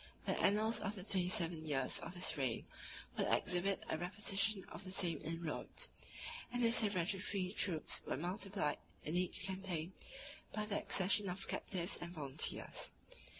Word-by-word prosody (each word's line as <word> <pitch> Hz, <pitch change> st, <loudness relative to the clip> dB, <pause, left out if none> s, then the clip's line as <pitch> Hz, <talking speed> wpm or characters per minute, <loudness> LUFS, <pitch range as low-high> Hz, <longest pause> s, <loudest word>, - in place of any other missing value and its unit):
The -, -, +1 dB
annals 215 Hz, +3 st, +3 dB
of 210 Hz, -, -3 dB
the 190 Hz, -, -7 dB
twenty 185 Hz, -3 st, +3 dB
seven 170 Hz, -3 st, +2 dB
years 135 Hz, -4 st, 0 dB
of 180 Hz, -, -7 dB
his 180 Hz, -, +5 dB
reign 130 Hz, -6 st, -1 dB, 0.5 s
would -, -, +1 dB
exhibit 185 Hz, +2 st, +2 dB
a 160 Hz, -, -1 dB
repetition 195 Hz, +2 st, +1 dB
of -, -, -9 dB
the 185 Hz, -, -7 dB
same 170 Hz, -5 st, +1 dB
inroads; 165 Hz, -, -3 dB, 0.6 s
and 245 Hz, 0 st, 0 dB
his 230 Hz, 0 st, +6 dB
hereditary 195 Hz, -1 st, 0 dB
troops 165 Hz, -6 st, 0 dB
were -, -, -1 dB
multiplied 180 Hz, -1 st, -1 dB, 0.2 s
in 155 Hz, -, -2 dB
each 180 Hz, 0 st, +1 dB
campaign 185 Hz, -3 st, -3 dB, 0.6 s
by 215 Hz, 0 st, -1 dB
the 210 Hz, -1 st, -1 dB
accession 195 Hz, +1 st, +3 dB
of 185 Hz, +2 st, -4 dB
captives 180 Hz, -1 st, 0 dB
and 175 Hz, 0 st, -5 dB
volunteers. 145 Hz, -1 st, +1 dB
185 Hz, 150 wpm, -38 LUFS, 165-200 Hz, 0.6 s, his